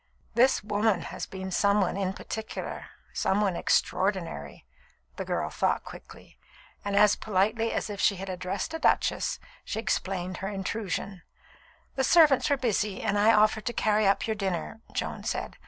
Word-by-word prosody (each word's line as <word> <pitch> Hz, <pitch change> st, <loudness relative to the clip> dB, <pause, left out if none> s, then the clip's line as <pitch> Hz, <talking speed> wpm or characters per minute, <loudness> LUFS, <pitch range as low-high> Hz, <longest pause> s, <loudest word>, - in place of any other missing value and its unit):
"This 255 Hz, 0 st, +4 dB
woman 205 Hz, -2 st, +1 dB
has -, -, -6 dB
been 190 Hz, 0 st, -6 dB
some 200 Hz, +2 st, +3 dB
one 185 Hz, -3 st, +1 dB
in 195 Hz, -1 st, -1 dB
particular 220 Hz, +2 st, -6 dB, 0.3 s
some 195 Hz, -, +1 dB
one 200 Hz, -4 st, +1 dB
extraordinary," 170 Hz, -, -1 dB, 0.5 s
the -, -, -4 dB
girl -, -, -2 dB
thought -, -, 0 dB
quickly; -, -, -13 dB, 0.4 s
and 200 Hz, 0 st, -2 dB
as 210 Hz, 0 st, +6 dB
politely 220 Hz, +3 st, 0 dB
as -, -, -2 dB
if 205 Hz, -2 st, -5 dB
she 200 Hz, -, +4 dB
had 195 Hz, +1 st, -7 dB
addressed 185 Hz, -, -3 dB
a 325 Hz, -, -3 dB
duchess, -, -, +1 dB, 0.3 s
she -, -, -5 dB
explained 185 Hz, -4 st, -2 dB
her 195 Hz, -, -4 dB
intrusion. 195 Hz, -1 st, -3 dB, 0.7 s
"The 265 Hz, -, 0 dB
servants 300 Hz, -2 st, +5 dB
were 285 Hz, -, +3 dB
busy, 215 Hz, -5 st, -1 dB
and 200 Hz, -, +1 dB
I 215 Hz, +2 st, +6 dB
offered 215 Hz, +1 st, +3 dB
to 240 Hz, -, -1 dB
carry 215 Hz, -2 st, +2 dB
up 195 Hz, -, +2 dB
your 220 Hz, -, -1 dB
dinner," 195 Hz, +2 st, -3 dB
Joan -, -, -3 dB
said. -, -, -3 dB
205 Hz, 165 wpm, -28 LUFS, 190-220 Hz, 0.7 s, as